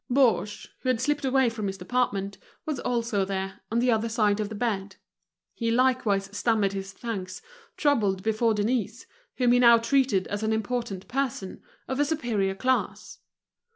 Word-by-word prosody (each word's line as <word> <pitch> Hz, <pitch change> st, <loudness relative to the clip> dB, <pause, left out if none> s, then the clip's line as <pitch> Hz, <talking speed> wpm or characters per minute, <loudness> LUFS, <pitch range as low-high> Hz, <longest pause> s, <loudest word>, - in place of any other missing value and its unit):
Baugé, 230 Hz, -6 st, +2 dB
who 255 Hz, -, -2 dB
had 250 Hz, -3 st, +2 dB
slipped 295 Hz, +3 st, 0 dB
away 265 Hz, -1 st, +3 dB
from 225 Hz, -3 st, -2 dB
his 195 Hz, 0 st, -4 dB
department, 200 Hz, -1 st, -1 dB, 0.3 s
was 305 Hz, -4 st, -2 dB
also 235 Hz, -4 st, 0 dB
there, 195 Hz, 0 st, -4 dB
on 230 Hz, -, 0 dB
the 245 Hz, +1 st, +3 dB
other 225 Hz, 0 st, +1 dB
side 215 Hz, -2 st, +2 dB
of 210 Hz, -1 st, -2 dB
the 220 Hz, -, -6 dB
bed. 205 Hz, -4 st, -2 dB, 0.6 s
He 230 Hz, -1 st, -2 dB
likewise 235 Hz, -5 st, +2 dB
stammered 210 Hz, -3 st, +1 dB
his 195 Hz, 0 st, -5 dB
thanks, 190 Hz, -4 st, -5 dB, 0.4 s
troubled 210 Hz, -11 st, +1 dB
before 220 Hz, +1 st, +1 dB
Denise, 220 Hz, +1 st, -1 dB, 0.3 s
whom 245 Hz, -2 st, +3 dB
he 245 Hz, -, +5 dB
now 235 Hz, -1 st, +8 dB
treated 230 Hz, -4 st, +2 dB
as 205 Hz, 0 st, -4 dB
an 220 Hz, 0 st, 0 dB
important 220 Hz, -3 st, -3 dB
person, 255 Hz, -8 st, -3 dB, 0.3 s
of 265 Hz, +1 st, -3 dB
a 290 Hz, -, +4 dB
superior 230 Hz, -11 st, -1 dB
class. 260 Hz, +5 st, -1 dB
225 Hz, 165 wpm, -26 LUFS, 200-250 Hz, 0.6 s, now